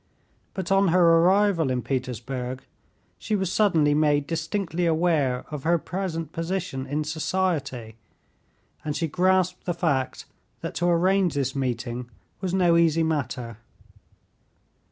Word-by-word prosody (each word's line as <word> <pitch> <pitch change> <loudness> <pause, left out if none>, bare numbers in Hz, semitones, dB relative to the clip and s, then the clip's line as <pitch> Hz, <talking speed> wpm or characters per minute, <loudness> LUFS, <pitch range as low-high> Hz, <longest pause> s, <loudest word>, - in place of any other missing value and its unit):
But 190 -1 -4
on 195 0 +4
her 170 -1 +5
arrival 185 -3 +3
in 125 -2 -1
Petersburg 130 0 -4 0.6
she 215 - -1
was 190 -3 -1
suddenly 165 -9 +3
made 145 -1 +2
distinctly 165 +2 -2
aware 160 -6 +1
of 150 -2 -4
her 170 +4 +2
present 165 -2 -4
position 165 -6 -3
in 150 +3 -1
society, 150 - -2 0.9
and 150 -1 -3
she 165 +1 -1
grasped 185 +2 +1
the 175 - -1
fact 145 -7 -1 0.4
that - - -5
to 175 - 0
arrange 180 0 +2
this 135 -1 -1
meeting 120 -2 -3 0.3
was 185 -2 -2
no 175 -2 +3
easy 165 -1 +3
matter. 130 -7 -2
165 Hz, 130 wpm, -25 LUFS, 135-180 Hz, 0.9 s, her